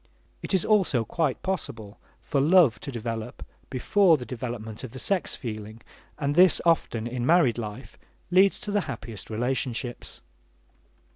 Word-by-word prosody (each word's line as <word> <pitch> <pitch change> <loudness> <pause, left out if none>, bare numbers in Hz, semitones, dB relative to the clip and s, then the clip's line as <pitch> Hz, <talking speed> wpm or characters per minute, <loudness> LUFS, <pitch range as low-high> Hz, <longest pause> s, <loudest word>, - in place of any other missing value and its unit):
It - - -1
is 185 - +1
also 185 - +2
quite 150 +1 -1
possible 115 - -4 0.2
for 140 - 0
love 155 -6 +5
to 140 - -7
develop 115 -1 -5 0.2
before 165 +6 +3
the 125 - -7
development 115 -3 -6
of 125 -2 -8
the - - -7
sex 190 +7 -1
feeling, 110 -2 -7 0.3
and 145 -1 -1
this 180 +1 +6
often, 145 -9 +1
in 120 0 -3
married 140 -5 +3
life, 110 +3 -8 0.3
leads 190 +2 +5
to 210 -4 -4
the 205 0 +2
happiest 110 -5 -7
relationships. 120 +1 -3
125 Hz, 145 wpm, -26 LUFS, 115-170 Hz, 0.3 s, this